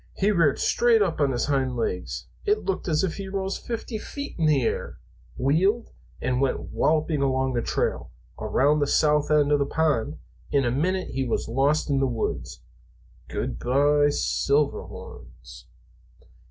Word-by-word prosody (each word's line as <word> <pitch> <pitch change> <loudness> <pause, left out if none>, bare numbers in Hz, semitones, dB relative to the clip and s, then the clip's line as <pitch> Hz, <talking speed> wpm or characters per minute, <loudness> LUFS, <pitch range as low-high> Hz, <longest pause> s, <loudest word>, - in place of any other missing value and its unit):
"He 200 +2 +2
reared 165 -8 +3
straight 235 -3 +3
up 165 -5 -2
on 140 -2 +3
his 120 - 0
hind 135 -3 0
legs 100 -6 -3 0.2
it 420 0 +1
looked 190 -1 -2
as 155 -1 +1
if 180 -4 -2
he 195 -1 -5
rose 195 0 -3
fifty 225 -1 -5
feet 280 +6 -7
in 160 - +3
the 145 -4 +3
air - - -2 0.4
wheeled, 190 - +1 0.3
and 130 0 -1
went 135 - -1
walloping 155 -1 +1
along 130 -1 +1
the 120 - 0
trail, - - -1 0.3
around 145 +3 +2
the 145 - +1
south 150 0 +2
end 150 -1 +3
of 145 - +4
the 140 - +2
pond. 150 -3 0 0.3
In 140 -3 +2
a 120 - +1
minute 185 +8 0
he 135 0 -2
was 120 - -2
lost 135 +6 +1
in 135 - +2
the 135 - +2
woods. 115 - -4 0.6
Good - - -4
by, 145 +3 +3
Silverhorns!" 65 - -2
145 Hz, 165 wpm, -25 LUFS, 130-170 Hz, 0.6 s, of